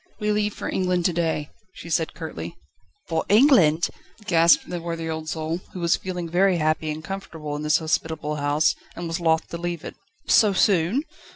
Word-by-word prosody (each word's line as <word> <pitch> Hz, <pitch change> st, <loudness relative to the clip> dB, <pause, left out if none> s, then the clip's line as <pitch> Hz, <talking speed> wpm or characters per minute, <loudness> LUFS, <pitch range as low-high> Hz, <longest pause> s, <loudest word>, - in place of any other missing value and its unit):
"We 210 Hz, -1 st, 0 dB
leave 210 Hz, 0 st, 0 dB
for -, -, -5 dB
England 180 Hz, -2 st, 0 dB
to 180 Hz, -, +2 dB
day", 160 Hz, -3 st, -1 dB, 0.2 s
she -, -, -11 dB
said 160 Hz, -1 st, -1 dB
curtly. -, -, -7 dB, 0.5 s
"For 160 Hz, -1 st, 0 dB
England?" 200 Hz, -, +5 dB, 0.4 s
gasped 170 Hz, -4 st, +4 dB
the 175 Hz, -1 st, -4 dB
worthy 165 Hz, -1 st, -4 dB
old 160 Hz, -1 st, -4 dB
soul, 160 Hz, +1 st, -3 dB
who 185 Hz, -, -6 dB
was 170 Hz, -1 st, +2 dB
feeling 180 Hz, -2 st, -5 dB
very 180 Hz, +2 st, +3 dB
happy 155 Hz, 0 st, 0 dB
and 155 Hz, +1 st, -4 dB
comfortable 160 Hz, -5 st, -6 dB
in 145 Hz, -, -4 dB
this 150 Hz, 0 st, +3 dB
hospitable 160 Hz, -1 st, -2 dB
house, 145 Hz, +2 st, +2 dB, 0.2 s
and 175 Hz, -, -5 dB
was 165 Hz, +2 st, -3 dB
loth 160 Hz, -1 st, +1 dB
to 170 Hz, -, -6 dB
leave 175 Hz, -2 st, -4 dB
it. -, -, -6 dB, 0.3 s
"So 210 Hz, -3 st, +5 dB
soon?" 190 Hz, -, +2 dB
165 Hz, 185 wpm, -24 LUFS, 160-180 Hz, 0.5 s, England